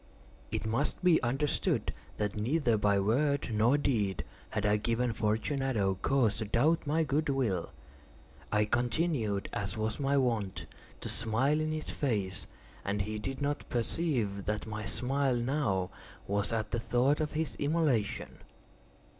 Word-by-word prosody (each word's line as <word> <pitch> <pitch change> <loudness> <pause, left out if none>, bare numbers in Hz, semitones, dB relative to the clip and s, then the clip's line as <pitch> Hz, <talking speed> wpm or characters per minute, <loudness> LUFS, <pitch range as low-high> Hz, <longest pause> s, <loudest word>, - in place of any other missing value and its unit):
It - - -3
must 120 +10 +1
be 175 -3 +5
understood, 135 +5 0 0.2
that 105 -1 -1
neither 120 +3 +1
by 105 -1 +3
word 135 +8 +1
nor 115 +6 +4
deed 105 -9 0 0.3
had 105 -1 -2
I 105 0 +4
given 115 +2 0
Fortunato 110 -1 0
cause 120 -5 +2
to 110 - -2
doubt 145 +10 +2
my 160 +3 +2
good 150 +1 0
will. 115 -11 0 0.8
I 105 0 +3
continued, 120 - 0
as 100 +1 -2
was 110 0 -1
my 140 0 +2
wont, 115 -7 0 0.4
to - - -3
smile 120 +7 +2
in 155 0 -1
his 155 0 -3
face, 100 -9 -1 0.4
and 100 +1 -1
he 105 +1 -4
did 135 +6 -4
not 145 +1 -2
perceive 115 - -1
that 105 0 -2
my 110 -1 -5
smile 135 +4 +1
now 120 -7 0 0.3
was 100 +1 0
at 110 -2 -2
the 115 - 0
thought 130 +6 +2
of 150 - -2
his 160 0 -1
immolation. 145 -8 0
120 Hz, 145 wpm, -31 LUFS, 105-140 Hz, 0.8 s, be